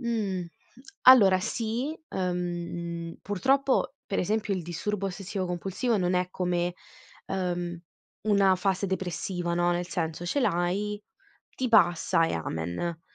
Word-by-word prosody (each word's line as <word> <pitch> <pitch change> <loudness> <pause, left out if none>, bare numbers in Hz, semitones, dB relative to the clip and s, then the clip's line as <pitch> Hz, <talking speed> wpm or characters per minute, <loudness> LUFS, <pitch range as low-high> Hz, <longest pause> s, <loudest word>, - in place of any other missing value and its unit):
mh. 210 -7 -1 0.6
Allora 200 -8 +8
sì, 240 - -2
ehm, 175 -2 -3
purtroppo 270 +7 +1
per 195 - -2
esempio 210 +2 0
il 185 - -3
disturbo 190 +4 -3
ossessivo 195 +1 -4
compulsivo 195 +7 -1
non 180 -1 +1
è 180 0 +1
come, 175 -1 -1 0.5
ehm, 175 -2 -2 0.4
una 200 -3 +4
fase 195 +1 0
depressiva, 175 -1 -2
no. 175 0 +2
Nel 175 0 -1
senso 165 -1 -3
ce 285 +11 0
l'hai, 205 0 0 0.5
ti 255 - -1
passa 170 -5 +4
e - - -2
amen. 85 - -3
185 Hz, 125 wpm, -28 LUFS, 175-210 Hz, 0.6 s, Allora